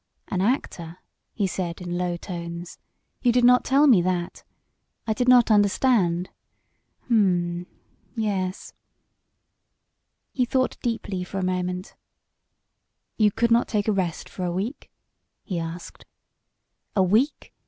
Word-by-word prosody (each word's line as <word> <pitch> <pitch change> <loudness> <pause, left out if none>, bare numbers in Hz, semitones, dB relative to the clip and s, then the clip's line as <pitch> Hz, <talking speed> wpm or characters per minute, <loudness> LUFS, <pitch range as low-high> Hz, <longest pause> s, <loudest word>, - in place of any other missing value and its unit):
"An 185 - -1
actor," 185 - -2 0.3
he 205 - -1
said 175 -2 -3
in 175 -1 -5
low 175 -1 -1
tones. 170 -1 -7 0.4
"You 245 - +4
did 245 +1 +2
not 250 +1 +6
tell 275 +3 +4
me 235 -11 +6
that. 175 -1 -2 0.6
I 220 - +1
did 245 +3 -1
not 245 -2 +6
understand... 205 -4 +2 0.8
Hm! 180 -6 +1 0.5
Yes!" 195 -4 -2 1.6
He 255 - 0
thought 255 +1 0
deeply 225 -6 -2
for 190 +2 -7
a 190 - -1
moment. 180 0 -3 1.2
"You 215 -2 +5
could 235 +3 0
not 235 +1 +4
take 210 -2 -1
a - - +3
rest 180 -4 -2
for 185 - -7
a 175 - -1
week?" 200 - -4 0.5
he 180 -5 -3
asked. 165 +1 -7 0.9
"A 195 - +4
week? 220 +11 +1
190 Hz, 130 wpm, -24 LUFS, 175-230 Hz, 1.6 s, not